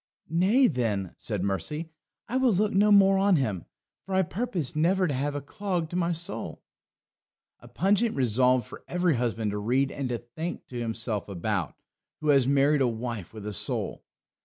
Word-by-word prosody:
"Nay, 195 +11 +4
then," 110 - 0
said 105 -5 -2
Mercy, 150 - -3 0.4
"I 255 - -1
will 260 -3 +3
look 205 +3 +1
no 205 +2 +4
more 195 -1 +6
on 195 -1 +4
him, 105 - -1 0.4
for 190 - -3
I 190 - +4
purpose 185 - -3
never 180 +5 +2
to 145 - -1
have 140 +2 -1
a 145 - -3
clog 175 +1 -3
to - - -4
my 175 -1 +1
soul." 170 0 -5 1.0
A - - -15
pungent 205 +5 +1
resolve 125 -1 +2
for - - -11
every 175 -5 +1
husband 115 -3 -1
to 105 - -3
read 130 +6 +1
and 135 -3 -4
to 120 - -1
think 140 +10 -6
to 125 - -5
himself 115 -3 -3
about, 95 -2 -2 0.4
who 155 - -2
has 135 -3 +5
married 140 +1 +3
a 130 - +4
wife 115 -5 -4
with 110 -2 -9
a 105 - -4
soul. - - -1
140 Hz, 185 wpm, -27 LUFS, 115-180 Hz, 1.0 s, more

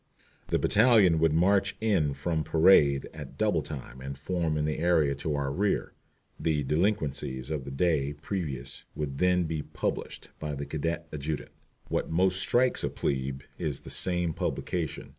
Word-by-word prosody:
The - - +1
battalion 105 -7 +5
would 80 -1 +3
march 95 +4 +3
in 95 -10 +1
from 80 +2 -1
parade 80 -3 +5
at - - -9
double - - +2
time 65 -3 -8
and 70 +1 -6
form 80 +1 -1
in 75 - 0
the 75 0 -2
area 80 -4 +3
to 75 +2 -3
our 70 -1 -1
rear. 100 +7 0 0.5
The 75 -3 0
delinquencies 75 -5 -1
of 75 -4 -3
the 70 - -6
day 75 -1 +1
previous 75 -5 -5
would 70 -2 -4
then 90 0 +3
be 80 -2 -2
published - - -4
by 75 -2 -3
the 70 +1 -4
cadet 80 +3 -3
adjutant. 75 +1 -4 0.4
What - - -1
most 95 +3 +2
strikes 125 +6 +2
a - - 0
"plebe" 65 -1 -2 0.2
is 75 -3 -2
this - - -5
same 90 -3 +1
publication. 85 -1 -3
80 Hz, 160 wpm, -28 LUFS, 70-90 Hz, 0.5 s, battalion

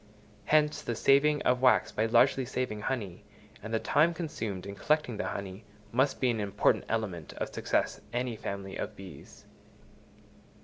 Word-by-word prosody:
Hence 150 -1 +3
the 120 - -3
saving 145 +5 +3
of 125 0 +2
wax 130 -1 +4
by 110 - 0
largely 130 +3 +4
saving 120 -4 -3
honey, 105 -7 -4 0.4
and 110 - -7
the 115 - +2
time 160 +8 +2
consumed 110 - -4
in 100 - -6
collecting 150 0 0
the - - -2
honey, 100 +1 -6 0.3
must 130 +4 +1
be 125 -2 +2
an 115 - -2
important 100 -2 +1
element 100 -8 -3
of - - -5
success - - -1
any 120 -1 -2
family 100 -2 -6
of - - -5
bees. 95 -3 -12
115 Hz, 160 wpm, -30 LUFS, 100-135 Hz, 0.4 s, wax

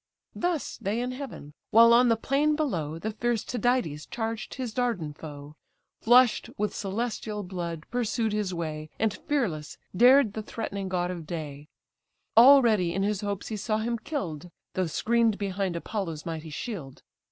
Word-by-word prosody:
Thus 345 -4 -2
they 205 +4 -2
in 250 +1 -2
heaven: 255 - -8 0.2
while 230 +1 +7
on 245 +1 +6
the 230 - +4
plain 280 +6 +1
below 170 - -2
The 215 +6 -3
fierce 230 +1 -1
Tydides 245 - -1
charged 225 -1 -4
his 250 -4 -4
Dardan 225 -12 -1
foe, 145 -1 -10 0.5
Flush'd 240 0 +5
with 210 - -1
celestial 210 0 -3
blood 170 -3 -5
pursued 230 -2 0
his 210 -3 -1
way, 155 -3 -4
And 220 -2 +1
fearless 185 - -2 0.2
dared 250 +1 +6
the 220 - -4
threatening 200 -3 -5
god 180 -1 -1
of 170 -4 -7
day; 150 -3 -6 0.7
Already 230 -8 +6
in 195 - 0
his 205 -1 0
hopes 205 -2 -3
he 220 - -3
saw 215 +1 -1
him 230 +1 -2
kill'd, 180 - -4 0.2
Though 185 -2 0
screen'd 230 +5 +2
behind 195 -2 -2
Apollo's 170 -3 -4
mighty 160 -1 -5
shield. 150 - -6
210 Hz, 155 wpm, -27 LUFS, 170-240 Hz, 0.7 s, while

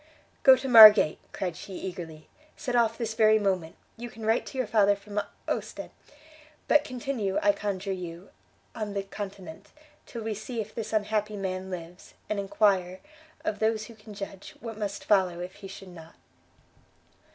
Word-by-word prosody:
"Go 265 -2 +8
to 265 +1 -5
Margate," 215 -9 +9
cried 180 -3 -4
she, 190 +2 -10
eagerly, 170 -4 -7 0.3
"set 245 -2 -3
off 230 -1 +2
this 225 -2 -3
very 220 -1 +5
moment! 190 -6 -1 0.2
you 240 +1 -7
can 220 -1 -9
write 225 +2 +1
to 270 - -8
your 255 - 0
father 205 -2 +3
from 205 +1 -4 0.3
Ostend. - - -4 0.8
But 300 - +5
continue, 245 -6 -3
I 205 - +6
conjure 200 -1 -4
you, 175 0 -8 0.4
on 210 -2 -5
the 200 - -1
continent, 195 -2 -8 0.4
till 235 -3 -7
we 220 0 -2
see 220 +3 -6
if 215 -1 -5
this 220 -2 -5
unhappy 215 0 -1
man 190 -1 -4
lives, 180 0 -9 0.2
and 210 - 0
enquire, 195 -2 +1 0.5
of 325 - -2
those 220 0 0
who 230 - -12
can 210 -1 -13
judge, 195 -1 -8
what 230 -1 -7
must 205 -1 -5
follow 185 -4 +2
if 180 +1 -7
he 200 -1 -9
should 195 0 -11
not!" 165 -2 -13
205 Hz, 170 wpm, -27 LUFS, 190-220 Hz, 0.8 s, Margate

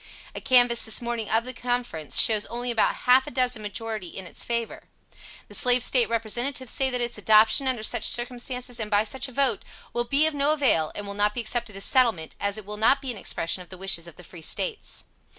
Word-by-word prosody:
A - - -8
canvass 245 -2 +4
this 220 - +2
morning 235 -2 -4
of 225 +2 +1
the 255 - -7
Conference, 245 - -2
shows 215 -1 +4
only 240 +1 -2
about 230 - +2
half 255 +1 +5
a - - -4
dozen 250 -3 0
majority 215 -1 -5
in 190 +2 -9
its - - -7
favor. 235 -1 -4 0.6
The - - -15
Slave 245 -1 +3
State 250 -2 +2
representatives 240 +3 0
say 265 -1 +3
that 250 -1 -2
its 240 -2 -2
adoption, 220 +5 +4
under 250 -4 -1
such - - +1
circumstances, 245 0 -2
and 215 -1 -3
by 205 0 +3
such 265 +4 -3
a - - -12
vote, 275 +2 +1 0.3
will 240 0 -2
be 280 +5 +2
of 315 - 0
no 285 +1 +1
avail, 250 - +1
and 205 - -6
will 200 - -4
not 205 +1 0
be 240 - -2
accepted 230 -2 -2
as 195 - -1
settlement, 230 - +2
as 200 +1 -1
it 215 - -9
will 210 +1 -5
not 230 +6 +3
be 270 -2 -5
an 235 - -8
expression 170 -1 -1
of 180 - -14
the 185 - -10
wishes 180 -3 -1
of 170 - -13
the 180 - -14
Free 170 0 -12
States. 435 - -2
235 Hz, 230 wpm, -24 LUFS, 210-250 Hz, 0.6 s, half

